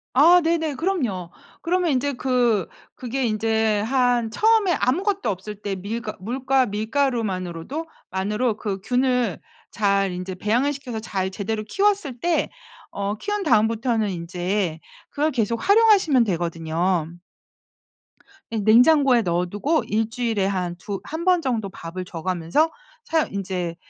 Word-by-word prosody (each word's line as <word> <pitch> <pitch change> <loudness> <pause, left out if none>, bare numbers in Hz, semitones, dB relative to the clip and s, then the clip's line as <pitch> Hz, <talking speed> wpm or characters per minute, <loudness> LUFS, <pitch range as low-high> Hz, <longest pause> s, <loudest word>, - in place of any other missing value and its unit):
아 340 +7 +7
네네. 320 -3 0
그럼요. 250 - -2 0.3
그러면 355 0 +1
인제 280 +2 0
그 245 -6 +1 0.3
그게 255 +1 -3
이제 220 -1 +1
한 245 0 +1
처음에 430 - +3
아무것도 380 - 0
없을 200 +3 -6
때 205 -1 -3
밀과 215 +4 -5
물과 260 +5 +1
밀가루만으로도 220 - -2 0.2
만으로 210 +5 0
그 200 -3 -3
균을 250 -4 +1 0.3
잘 200 -2 +1
인제 180 +1 -5
배양을 235 +9 +1
시켜서 260 -5 -6
잘 190 -4 -2
제대로 215 +2 -3
키웠을 390 - 0
때 345 +1 +1 0.5
어 200 +1 -2
키운 415 - -2
다음부터는 225 - +2
인제 175 0 -2 0.3
그걸 300 +2 0
계속 230 - -1
활용하시면 400 - +5
되거든요. 170 -1 -1 1.4
예. 225 - -2
냉장고에 250 +4 +5
넣어두고 195 - 0
1 220 +1 0
주일에 230 -4 -1
한 180 -3 -2
두 195 +3 -5
한 320 +2 -5
번 365 -2 +4
정도 230 -8 -1
밥을 180 0 -7
줘가면서 180 - 0 0.3
사 325 -7 +1
인제 185 -5 -4
225 Hz, 280 characters per minute, -23 LUFS, 190-275 Hz, 1.4 s, 아